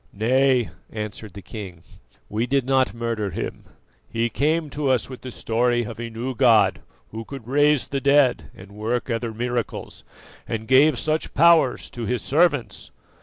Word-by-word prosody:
"Nay," 125 Hz, +2 st, +2 dB, 0.2 s
answered 105 Hz, -2 st, -6 dB
the 100 Hz, -1 st, -10 dB
king, 95 Hz, -7 st, -9 dB, 0.4 s
"we 115 Hz, -, -2 dB
did 135 Hz, 0 st, +1 dB
not 130 Hz, 0 st, +2 dB
murder 115 Hz, -3 st, -2 dB
him; -, -, -6 dB, 0.4 s
he 115 Hz, +1 st, -1 dB
came 155 Hz, +5 st, 0 dB
to 145 Hz, -1 st, -1 dB
us 130 Hz, -3 st, +2 dB
with 130 Hz, -, -9 dB
the 130 Hz, -, -7 dB
story 120 Hz, +1 st, 0 dB
of 115 Hz, 0 st, -8 dB
a 120 Hz, 0 st, -5 dB
new 120 Hz, +3 st, -4 dB
God 110 Hz, -6 st, +4 dB, 0.3 s
who 115 Hz, -, -6 dB
could 135 Hz, -1 st, -10 dB
raise 145 Hz, +1 st, +3 dB
the 140 Hz, -1 st, -3 dB
dead 140 Hz, -2 st, +3 dB
and 95 Hz, +2 st, -13 dB
work 115 Hz, +4 st, -3 dB
other 115 Hz, 0 st, -2 dB
miracles, 120 Hz, +1 st, -4 dB, 0.4 s
and 110 Hz, -1 st, -4 dB
gave 135 Hz, +2 st, +5 dB
such 155 Hz, +5 st, -1 dB
powers 160 Hz, -4 st, +4 dB
to 120 Hz, -3 st, -5 dB
His 120 Hz, -1 st, -1 dB
servants. 145 Hz, -3 st, +1 dB
120 Hz, 165 wpm, -23 LUFS, 115-135 Hz, 0.4 s, gave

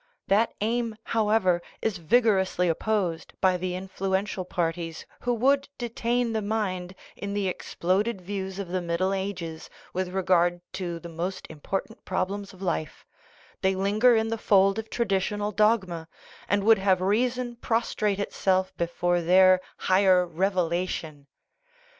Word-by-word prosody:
That 210 Hz, +4 st, +3 dB
aim, 230 Hz, +1 st, 0 dB
however, 210 Hz, -5 st, +2 dB, 0.2 s
is 210 Hz, -5 st, -2 dB
vigorously 190 Hz, -2 st, +2 dB
opposed 175 Hz, -1 st, -1 dB
by 185 Hz, -1 st, +3 dB
the 180 Hz, 0 st, -3 dB
influential 190 Hz, +1 st, -2 dB
parties 165 Hz, -2 st, -3 dB
who 245 Hz, -, -1 dB
would 275 Hz, +4 st, +2 dB
detain 240 Hz, 0 st, -1 dB
the 220 Hz, -, 0 dB
mind 190 Hz, -4 st, -2 dB, 0.2 s
in 200 Hz, 0 st, -5 dB
trie 205 Hz, -, 0 dB
exploded 190 Hz, +3 st, -1 dB
views 190 Hz, 0 st, -5 dB
of 200 Hz, -3 st, -5 dB
the 185 Hz, +1 st, -1 dB
Middle 175 Hz, +3 st, 0 dB
Ages 180 Hz, -5 st, -4 dB, 0.2 s
with 185 Hz, 0 st, -1 dB
re 190 Hz, +1 st, -2 dB
gard 175 Hz, -1 st, +3 dB
to 175 Hz, -3 st, -3 dB
the 170 Hz, -, -9 dB
most 175 Hz, +3 st, -4 dB
important 195 Hz, +8 st, -5 dB
problems 195 Hz, +2 st, -2 dB
of 190 Hz, 0 st, -12 dB
life; 165 Hz, -4 st, -3 dB, 0.6 s
they 190 Hz, 0 st, +2 dB
linger 210 Hz, +6 st, +4 dB
in 220 Hz, 0 st, +1 dB
the 225 Hz, 0 st, -2 dB
fold 195 Hz, 0 st, +4 dB
of 220 Hz, -, -6 dB
traditional 205 Hz, -1 st, -1 dB
dogma, 195 Hz, -6 st, +1 dB, 0.4 s
and 205 Hz, 0 st, +2 dB
would 220 Hz, 0 st, +6 dB
have 190 Hz, -1 st, +3 dB
reason 240 Hz, +5 st, 0 dB
prostrate 225 Hz, -3 st, 0 dB
itself 190 Hz, -2 st, 0 dB
before 175 Hz, +1 st, 0 dB
their 185 Hz, +2 st, +6 dB
" -, -, -35 dB
higher 185 Hz, -1 st, +5 dB
revelation." 170 Hz, -4 st, -2 dB
190 Hz, 140 wpm, -26 LUFS, 180-215 Hz, 0.6 s, would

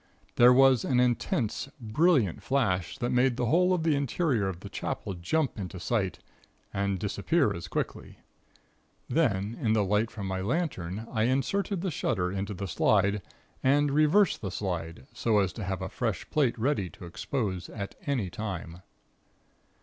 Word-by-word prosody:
There 120 Hz, +1 st, +7 dB
was 130 Hz, -2 st, +5 dB
an 125 Hz, -2 st, +2 dB
intense, 120 Hz, 0 st, 0 dB
brilliant 120 Hz, -, +2 dB
flash, 110 Hz, -8 st, 0 dB
that 120 Hz, -2 st, -1 dB
made 125 Hz, 0 st, +3 dB
the 125 Hz, -, 0 dB
whole 180 Hz, +9 st, +3 dB
of 180 Hz, -3 st, +1 dB
the 160 Hz, -2 st, +3 dB
interior 140 Hz, -, 0 dB
of 90 Hz, -2 st, -5 dB
the -, -, -7 dB
Chapel -, -, -4 dB
jump 115 Hz, -, -1 dB
into 95 Hz, -1 st, -5 dB
sight, 95 Hz, -6 st, -1 dB, 0.6 s
and 100 Hz, 0 st, 0 dB
disappear 105 Hz, -, +1 dB
as 85 Hz, -1 st, -6 dB
quickly. -, -, -4 dB, 0.9 s
Then, 110 Hz, -9 st, +1 dB
in 110 Hz, -2 st, +2 dB
the 110 Hz, -2 st, +3 dB
light 105 Hz, +3 st, +1 dB
from 105 Hz, -3 st, -6 dB
my 95 Hz, 0 st, -2 dB
lantern, 110 Hz, -, -2 dB
I 110 Hz, -2 st, +1 dB
inserted 170 Hz, -, 0 dB
the 190 Hz, -1 st, -1 dB
shutter 90 Hz, -, -1 dB
into 100 Hz, +1 st, -3 dB
the 100 Hz, +2 st, -4 dB
slide, 100 Hz, +2 st, +2 dB, 0.4 s
and 145 Hz, +2 st, +3 dB
reversed 155 Hz, +6 st, +3 dB
the 95 Hz, -, -3 dB
slide, 85 Hz, -6 st, -4 dB
so 110 Hz, -2 st, +1 dB
as 95 Hz, -4 st, +2 dB
to 110 Hz, -, -6 dB
have 95 Hz, -1 st, -3 dB
a -, -, -2 dB
fresh 115 Hz, -4 st, -3 dB
plate 135 Hz, -6 st, +2 dB
ready 115 Hz, -6 st, 0 dB
to 85 Hz, -, -12 dB
expose 95 Hz, 0 st, -3 dB
at 100 Hz, -3 st, -6 dB
any 120 Hz, -11 st, -1 dB
time. 95 Hz, -6 st, -5 dB
110 Hz, 165 wpm, -28 LUFS, 95-135 Hz, 0.9 s, There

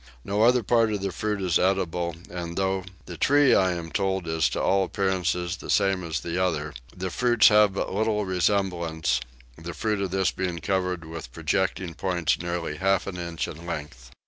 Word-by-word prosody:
No 100 Hz, +2 st, -1 dB
other 120 Hz, +1 st, +5 dB
part 115 Hz, +1 st, +3 dB
of 100 Hz, -2 st, -2 dB
the 100 Hz, -, -1 dB
fruit 105 Hz, +2 st, -2 dB
is 90 Hz, -3 st, +2 dB
eatable 90 Hz, -3 st, 0 dB
and, 85 Hz, -1 st, -6 dB
though 95 Hz, -1 st, 0 dB, 0.2 s
the 85 Hz, -, -8 dB
tree 145 Hz, -1 st, +4 dB
I 95 Hz, -1 st, +3 dB
am 85 Hz, -1 st, -6 dB
told 95 Hz, -3 st, -1 dB
is 80 Hz, -1 st, +1 dB
to -, -, -3 dB
all 95 Hz, 0 st, +2 dB
appearance 95 Hz, -2 st, 0 dB
the 90 Hz, +1 st, -5 dB
same 95 Hz, -2 st, +2 dB
as 80 Hz, -5 st, -3 dB
the 85 Hz, +2 st, -1 dB
other, 75 Hz, -4 st, -1 dB, 0.2 s
the 95 Hz, 0 st, -3 dB
fruits 120 Hz, +2 st, +5 dB
have 105 Hz, -2 st, +5 dB
but -, -, -2 dB
little 105 Hz, 0 st, 0 dB
resemblance, 85 Hz, -7 st, 0 dB, 0.4 s
the 85 Hz, 0 st, -7 dB
fruit 105 Hz, -2 st, -1 dB
of 95 Hz, -, -1 dB
this 95 Hz, +1 st, +1 dB
being 90 Hz, -2 st, -3 dB
covered 90 Hz, -1 st, -1 dB
with 80 Hz, -6 st, -8 dB
projecting 85 Hz, +3 st, -1 dB
points 90 Hz, -1 st, 0 dB
nearly 85 Hz, -3 st, -3 dB
half 95 Hz, +1 st, +1 dB
an 95 Hz, -2 st, -5 dB
inch 85 Hz, -2 st, -3 dB
in 80 Hz, +1 st, -9 dB
length. 70 Hz, -7 st, -6 dB
90 Hz, 190 wpm, -26 LUFS, 85-100 Hz, 0.4 s, other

